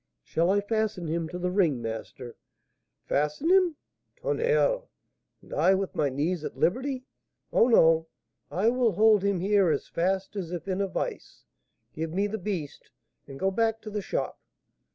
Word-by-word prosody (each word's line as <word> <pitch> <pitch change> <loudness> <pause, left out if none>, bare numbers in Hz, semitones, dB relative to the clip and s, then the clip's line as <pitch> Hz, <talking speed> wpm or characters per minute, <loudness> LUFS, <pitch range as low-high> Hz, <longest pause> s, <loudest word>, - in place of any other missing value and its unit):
"Shall 170 +2 0
I 200 +1 +3
fasten 215 -3 -1
him 165 0 -2
to 180 - -5
the 180 0 -1
ring, 175 -9 +2
master?" 115 +2 -6 0.7
"Fasten 150 - 0
him! 370 -4 +4 0.4
Tonnerre! - - +1 0.6
and - - -12
I 190 - +4
with 195 0 -2
my 145 -2 +1
knees 155 +5 -1
at - - -6
liberty? 255 +7 0 0.5
Oh, 230 - +5
no; 165 -8 +5 0.4
I 200 +6 +2
will 240 -3 +2
hold 210 +1 +5
him 200 -3 +1
here 195 -2 +3
as 150 - -1
fast 190 +4 -1
as 180 -4 -4
if 175 0 -5
in 190 0 -1
a 200 - +1
vice. - - -5 0.5
Give 160 0 -4
me 200 +2 +2
the 215 +1 -3
beast, 180 -7 -5 0.4
and 135 -1 -9
go 195 - +1
back 225 +2 +1
to 215 - -8
the 210 0 -2
shop." - - -3
195 Hz, 170 wpm, -27 LUFS, 165-220 Hz, 0.7 s, Oh